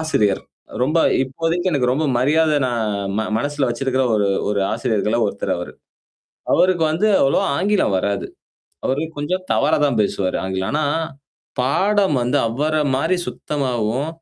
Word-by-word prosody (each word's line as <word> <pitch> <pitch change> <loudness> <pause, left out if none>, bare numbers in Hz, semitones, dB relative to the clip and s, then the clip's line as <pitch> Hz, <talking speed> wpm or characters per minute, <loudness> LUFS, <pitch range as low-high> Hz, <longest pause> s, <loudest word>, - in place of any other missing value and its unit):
ஆசிரியர். 105 -11 +1 0.4
ரொம்ப 150 +6 +2 0.3
இப்போதைக்கு 165 +7 -1
எனக்கு 125 -4 +1
ரொம்ப 155 +4 0
மரியாத 155 +4 +3
நான் 120 -3 -1 0.3
ம - - +1 0.2
மனசுல 145 +1 -1
வச்சிருக்கிற 130 +2 0
ஒரு 100 -2 +2 0.2
ஒரு 100 -1 0
ஆசிரியர்கள 110 -1 0
ஒருத்தர் - - -2
அவரு. - - -6 0.8
அவருக்கு 180 -3 +3
வந்து 195 +7 +1
அவ்வளோ 135 - +3
ஆங்கிலம் 195 - +1
வராது. 100 +1 -1 0.6
அவரு 135 +3 0 0.2
கொஞ்சம் 180 +6 -2
தவறா - - +2
தான் 130 -6 0
பேசுவாரு, 100 -2 -1
ஆங்கிலம். 95 0 -2
ஆனா. 150 0 +1 0.7
பாடம் 190 +6 +2
வந்து 125 +4 +1
அவர 150 +7 -1 0.2
மாரி 165 +7 +1
சுத்தமாவும். 130 -2 -2
135 Hz, 135 wpm, -20 LUFS, 115-160 Hz, 0.8 s, மரியாத